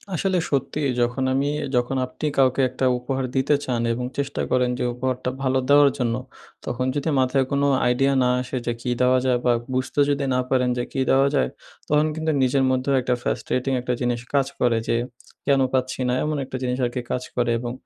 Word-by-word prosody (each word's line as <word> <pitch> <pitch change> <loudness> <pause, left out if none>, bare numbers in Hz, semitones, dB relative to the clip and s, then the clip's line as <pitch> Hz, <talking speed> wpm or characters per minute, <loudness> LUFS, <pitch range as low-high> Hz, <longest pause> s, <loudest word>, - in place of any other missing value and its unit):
আসলে 190 +2 0
সত্যিই 140 +1 0
যখন 120 +2 0
আমি, 140 +2 +1 0.3
যখন 125 +2 +1
আপনি 130 +4 -7
কাউকে 130 0 +3
একটা 130 +1 -2
উপহার 130 +1 -2
দিতে 135 +2 +3
চান 120 -2 -1
এবং 125 +1 -3
চেষ্টা 140 0 -2
করেন 125 -1 +2
যে - - 0
উপহারটা 125 0 -2
ভালো 130 0 +1
দেওয়ার 145 0 +7
জন্য। 120 -2 0 0.5
তখন 125 +1 -2
যদি 145 +3 -1
মাথায় 130 +1 +2
কোনো 140 0 +2 0.2
আইডিয়া 135 +3 +2
না 125 - +2
আসে, 130 +1 -4
যে 120 - 0
কী 125 - -3
দেওয়া 130 0 +4
যায়? 125 -1 +3
বা 120 - +4 0.2
বুঝতে 130 +3 -2
যদি 140 -1 0
না 125 - +2
পারেন 125 -1 +2
যে, 120 - 0
কি - - -3
দেওয়া 135 +1 +4
যায়? 135 - +2 0.4
তখন 150 +1 +3
কিন্তু 160 0 -1
নিজের 135 +1 +2
মধ্যেও 130 +2 0
একটা 125 0 0
ফ্রাস্ট্রেটিং 130 +1 -1
একটা 125 0 -1
জিনিস 120 -1 0
কাজ 135 -1 +3
করে। 120 -2 +2
যে - - +2 0.5
কেন 135 -1 +4
পাচ্ছি 130 0 -1
না! 125 - +1
এমন 150 -1 -1
একটা 130 0 -5
জিনিস 125 0 -1
আরকি 125 +1 -3
কাজ 125 - -1
করে, 120 -1 +1
এবং 120 0 -4
130 Hz, 200 wpm, -23 LUFS, 125-140 Hz, 0.5 s, দেওয়ার